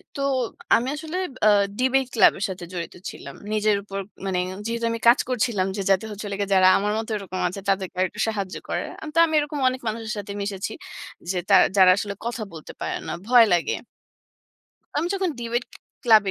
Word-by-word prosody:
তো। 280 - -3 0.5
আমি 240 +3 +1
আসলে 315 +3 -5 0.3
আ - - +8 0.3
ডিবেট 260 +1 +3
ক্লাব 215 - +7
এর - - -2
সাথে 180 -2 -6
জড়িত 170 -2 -5 0.2
ছিলাম। 140 - -10 0.2
নিজের 215 0 +3
উপর 195 -1 -5 0.3
মানে, 185 -2 0 0.3
যেহেতু 230 0 -2
আমি 230 - -3
কাজ 240 +3 +7
করছিলাম 225 -6 +1
যে - - -1
যাতে 195 +3 +2
হচ্ছে 210 0 -7
হলো 200 - -3
গিয়ে, 200 -1 -1
যারা 185 0 +6
আমার 205 +1 0
মতো 220 0 -4
এরকম 185 -2 -6
আছে, 185 +3 -5
তাদেরকে 190 -1 0
আর 185 - +4
একটু - - -12
সাহায্য 200 -4 -3
করা। - - -1 0.3
তো - - -6
আমি 320 - -4
এরকম 295 0 -3
অনেক 255 0 -5
মানুষের 220 0 -3
সাথে 205 0 -5
মিশেছি 200 -1 -3 0.6
যে, 185 - 0
তার 195 -2 +8 0.2
যারা 185 -1 +8
আসলে 205 0 -2
কথা 235 -1 -3
বলতে 160 -2 -9
পারে - - -2
না। - - -3
ভয় 240 -1 +7
লাগে 175 -1 +1 1.2
আমি 320 +3 +1
যখন 380 -2 0
ডিবেট 240 +1 -1 0.4
ক্লাব 220 -3 +7
215 Hz, 195 wpm, -24 LUFS, 195-240 Hz, 1.2 s, আ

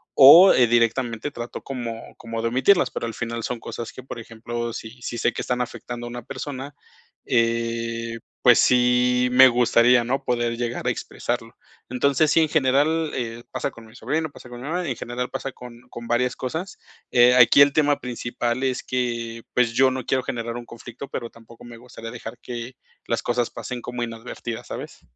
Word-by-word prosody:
o, 165 +8 +10
eh, 125 -2 +4
directamente 120 +3 +1
trato 120 -1 -7
como 120 -4 -6
como 115 0 -5
de 115 - 0
omitirlas, 175 +10 +3
pero, - - -4
al 115 - -5
final 115 +1 -4
son 120 -2 -3
cosas 115 +1 -7
que, - - -9
por 130 - -8
ejemplo, 115 +1 -5
si 115 +2 -8
si 120 - -4
sé 120 - +2
que - - -4
están 125 0 -1
afectando 120 0 -6
a - - -6
una 120 0 -7
persona, 140 +3 -6 0.5
eh, 115 -1 -1 0.2
pues, 125 -2 +7
sí 125 0 +3
me 130 +1 +8
gustaría, 120 0 +4
¿no? 135 +4 -2
Poder 120 -2 -1
llegar 120 0 -3
a - - +4
expresarlo. - - -4 0.3
Entonces, 140 +4 +2
sí, - - +4
en 155 - +2
general, 150 +2 +2
eh, 120 -1 -4
pasa - - -2
con 115 -1 -14
mi 110 +1 -17
sobrino, 160 +3 -2
pasa 125 - -14
con 120 0 -9
mi 135 - -7
mamá, 175 +1 -2
en 125 - -2
general 125 +1 -4
pasa 135 - -5
con 120 -1 -12
con 120 0 -9
varias 125 +1 +1
cosas. 160 +9 -5 0.3
Eh, 125 0 +6
aquí 125 +2 +7
el 140 0 +6
tema 145 -1 +2
principal 120 0 -3
es 130 -1 0
que, 115 -2 -3
pues, 120 -2 +2
yo 130 +2 +4
no 130 0 -4
quiero 130 -1 0
generar 115 0 -4
un 120 - -8
conflicto, 120 +3 -10
pero, 115 - -5
tampoco 115 +1 -16
me 120 -1 -11
gustaría 115 -1 -10
dejar 120 0 -8
que 120 +1 -7 0.3
las 115 - -1
cosas 120 -1 0
pasen 125 -2 -6
como 125 0 -5
inadvertidas, 115 0 -6
¿sabes? - - -8
120 Hz, 195 wpm, -23 LUFS, 115-130 Hz, 0.5 s, o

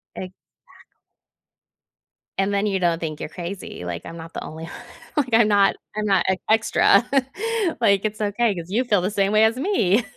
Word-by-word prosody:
Exact 185 0 -8 2.0
And 195 +1 +1
then 200 +1 +1
you 195 -2 0
don't 170 -2 +1
think 155 -2 -5
you're - - -5
crazy, 175 - -7
like, 85 -1 -5
I'm 165 - -8
not 165 0 -10
the - - -5
only, 160 +1 -8
o - - -10 0.5
like, 255 -5 0
I'm 225 -1 +6
not 200 -2 +4 0.2
I'm 215 0 -2
not 195 -3 +2
ex 190 0 0
extra, 220 +1 +4 0.7
like, 200 -4 +3
it's 215 0 -3
okay, 210 +2 +1
'cause 170 -1 -7
you 225 +6 +1
feel 210 -7 +2
the 185 - 0
same 200 -1 +1
way 215 +1 +5
as 220 +1 +2
me. 250 - +2
200 Hz, 190 wpm, -22 LUFS, 175-215 Hz, 2.0 s, I'm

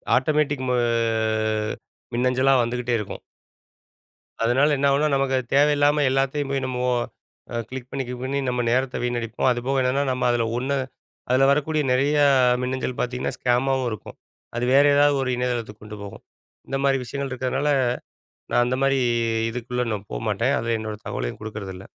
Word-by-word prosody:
Automatic 145 0 +1
மொ 125 - +1 1.4
மின்னஞ்சலா 130 +2 +3
வந்துகிட்டே 120 0 -1
இருக்கும். 105 - -6 1.2
அதனால 135 +6 +3
என்ன 140 +1 +2
ஆகும்ன்னா, 145 +2 +2
நமக்கு 135 -1 +1
அது 130 - -2
தேவையில்லாம 145 +1 +4
எல்லாத்தையும் 135 +1 0
போய் 135 -1 -1
நம்மோ 125 -1 -2 0.7
அ - - 0
கிளிக் 130 -1 -7
பண்ணி, 135 0 -3
கிளிக் 125 +1 -6
பண்ணி 135 +2 -2
நம்ம 125 0 0
நேரத்தை 130 +1 0
வீணடிப்போம். 120 0 0
அதுபோக 125 +3 0
என்னன்னா, 130 +3 +1
நம்ம 125 0 -2
அதுல 120 -1 +1
ஒண்ணு, 135 +3 -1 0.5
அதுல 130 +2 +4
வரக்கூடிய 150 +1 +1
நெறைய 140 +4 +2 0.4
மின்னஞ்சல் 125 0 -3
பாத்தீங்கன்னா, 125 0 -2
ஸ்கேமாவும் 130 +1 +1
இருக்கும். 110 - -8 0.4
அது 120 - 0
வேறு 140 +1 +6
ஏதாவது 145 0 +4
ஒரு 130 - -2
இணையதளத்துக்கு 120 -4 -3
கொண்டு 105 0 -9
போகும். 100 - -10 0.5
இந்த 135 - -1
மாரி 135 -1 +3
விஷயங்கள் 140 +2 -4
இருக்கிறனால, 130 +3 -1 0.8
நான் 120 - +4
அந்த 125 +1 -1
மாரி 135 0 +3 0.5
இதுக்குள்ள 125 +1 -3
நான் 100 -1 -6
போகமாட்டேன். 115 +5 0
அதுல 115 0 -1
என்னோட 110 -1 -5
தகவலையும் - - -4
குடுக்குறதில்ல. 100 -3 -7
130 Hz, 150 wpm, -23 LUFS, 120-135 Hz, 1.4 s, வேறு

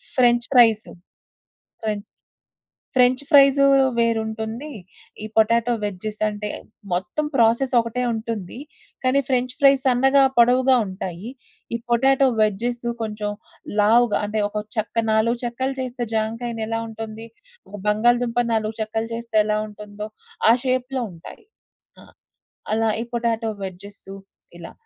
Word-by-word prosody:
French 240 -2 +3
fries. 225 -4 +5 1.0
French 210 -1 -3 0.9
French 250 +1 +4
fries 275 -2 +6 0.3
వేరుంటుంది. 225 +3 -1 0.5
ఈ - - -4
potato 230 +2 +3
వెడ్జెసంటే, 210 +1 -3 0.4
మొత్తం 185 +12 -2
ప్రాసెసొకటే 235 0 +2
ఉంటుంది. 220 -3 -5 0.5
కానీ 260 +2 +3
ఫ్రెంచ్ 255 -2 0
ఫ్రైస్ 275 -1 +5
సన్నగా, 270 +2 +4
పొడవుగా 255 +2 +5
ఉంటాయి. 185 +2 -6 0.5
ఈ - - 0
పొటాటో 270 +3 +4
వెజ్జెస్ 230 +3 0 0.2
కొంచెం 210 -1 -3 0.5
లావుగా, 230 +2 +4
అంటే 215 +1 -1
ఒక 210 0 -4
చెక్క 225 +1 -1
4 230 +2 +2
చెక్కలు 260 +3 -2
చేస్తే 250 -1 -4
జాంకాయినెలా 225 0 -2
ఉంటుంది? 225 0 -8 0.4
ఒక - - -9
బంగాళదుంప 240 +3 +2
నాలుగు 220 0 -1
చెక్కలు 225 +1 -3
చేస్తే 230 -1 -3
ఎలా 210 0 0
ఉంటుందో 210 0 -8 0.4
ఆ - - +7
షేప్‌లో 255 0 -1
ఉంటాయి. 165 - -13 0.6
ఆ! - - -15 0.7
అలా 225 0 +1
ఈ - - -4
పొటాటో 230 -1 -1
వెడ్జెసు 195 +1 -9 0.4
ఇలా. 170 - -10
230 Hz, 115 wpm, -22 LUFS, 215-245 Hz, 1.0 s, ఆ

